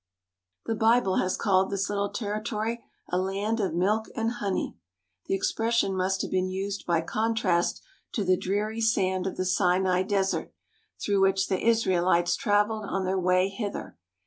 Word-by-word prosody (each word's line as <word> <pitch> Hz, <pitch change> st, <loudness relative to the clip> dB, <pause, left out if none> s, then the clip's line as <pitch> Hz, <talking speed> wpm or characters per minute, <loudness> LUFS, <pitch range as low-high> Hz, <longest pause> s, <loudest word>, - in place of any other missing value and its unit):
The 225 Hz, -, -1 dB
Bible 220 Hz, -3 st, +3 dB
has 185 Hz, -, 0 dB
called 190 Hz, -3 st, +2 dB
this 200 Hz, 0 st, -1 dB
little 200 Hz, 0 st, -1 dB
territory 215 Hz, +2 st, -3 dB, 0.3 s
a 180 Hz, -, +1 dB
land 200 Hz, +4 st, -1 dB
of 190 Hz, -6 st, -1 dB
milk 210 Hz, +5 st, +1 dB
and 225 Hz, 0 st, 0 dB
honey. 200 Hz, -5 st, -2 dB, 0.5 s
The -, -, +1 dB
expression 225 Hz, 0 st, 0 dB
must 190 Hz, +1 st, 0 dB
have -, -, -5 dB
been 185 Hz, 0 st, +1 dB
used 195 Hz, +1 st, -4 dB
by 170 Hz, -2 st, +2 dB
contrast 210 Hz, -2 st, 0 dB, 0.3 s
to 215 Hz, -, 0 dB
the 185 Hz, -1 st, +3 dB
dreary 210 Hz, +5 st, -2 dB
sand 190 Hz, -4 st, +1 dB
of 190 Hz, -, -5 dB
the 185 Hz, -, -1 dB
Sinai 185 Hz, 0 st, +2 dB
desert, 195 Hz, 0 st, -1 dB, 0.4 s
through 200 Hz, -1 st, +1 dB
which 195 Hz, 0 st, +2 dB
the 190 Hz, -, 0 dB
Israelites 180 Hz, -6 st, +3 dB
travelled 210 Hz, -2 st, +1 dB
on 195 Hz, -1 st, -2 dB
their 190 Hz, +1 st, 0 dB
way 185 Hz, +1 st, +3 dB
hither. 200 Hz, +1 st, -5 dB
195 Hz, 160 wpm, -27 LUFS, 185-215 Hz, 0.5 s, Bible